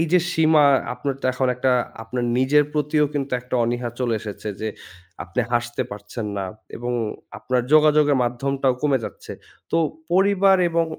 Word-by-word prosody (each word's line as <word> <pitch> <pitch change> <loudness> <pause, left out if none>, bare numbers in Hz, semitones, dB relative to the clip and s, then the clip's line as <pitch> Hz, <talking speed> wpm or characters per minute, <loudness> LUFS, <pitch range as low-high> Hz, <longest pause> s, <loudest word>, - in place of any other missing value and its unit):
এই 165 - +2
যে 180 - +7
সীমা 155 -2 +4 0.3
আপনার 140 -2 -3
তো - - +1
এখন 130 +1 0
একটা 130 +1 +1 0.3
আপনার 120 +2 -3
নিজের 145 +3 +4
প্রতিও 150 0 +1
কিন্তু 140 -1 -3
একটা 125 0 -6
অনীহা 120 +1 -2
চলে 120 -3 0
এসেছে। 105 0 -7
যে 110 - -2 0.6
আপনি 85 +8 -2
হাসতে 120 0 0
পারছেন 105 +2 -6
না 100 - -2 0.3
এবং 120 +1 -3 0.5
আপনার 125 -1 0
যোগাযোগের 150 -2 +5
মাধ্যমটাও 135 +2 0
কমে 140 -3 +2
যাচ্ছে। - - -8 0.4
তো 165 - +2 0.3
পরিবার 195 0 +4
এবং 170 0 +1
135 Hz, 160 wpm, -22 LUFS, 120-150 Hz, 0.6 s, যে